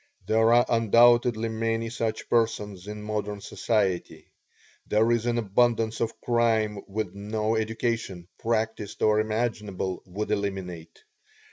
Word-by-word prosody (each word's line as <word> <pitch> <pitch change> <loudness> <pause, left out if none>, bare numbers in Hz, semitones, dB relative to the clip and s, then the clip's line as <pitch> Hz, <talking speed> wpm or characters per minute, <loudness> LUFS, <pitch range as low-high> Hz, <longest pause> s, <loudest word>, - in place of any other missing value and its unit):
There 110 +1 +3
are 120 +1 +5
undoubtedly 115 0 +4
many 115 0 -2
such 115 -2 -3
persons 105 -5 0
in 105 0 -6
modern 105 -1 -3
society. 100 -4 -2 0.6
There 110 +2 +3
is 120 0 +1
an 120 0 +1
abundance 115 +1 +1
of 115 -1 -2
crime 115 -3 +1
which 110 +2 -3
no 105 +2 -2
education, 110 -5 -2
practiced 110 -2 -2
or 105 0 +4
imaginable, 110 -4 -2
would 105 +3 -4
eliminate. 95 -5 -4
110 Hz, 120 wpm, -26 LUFS, 105-115 Hz, 0.6 s, are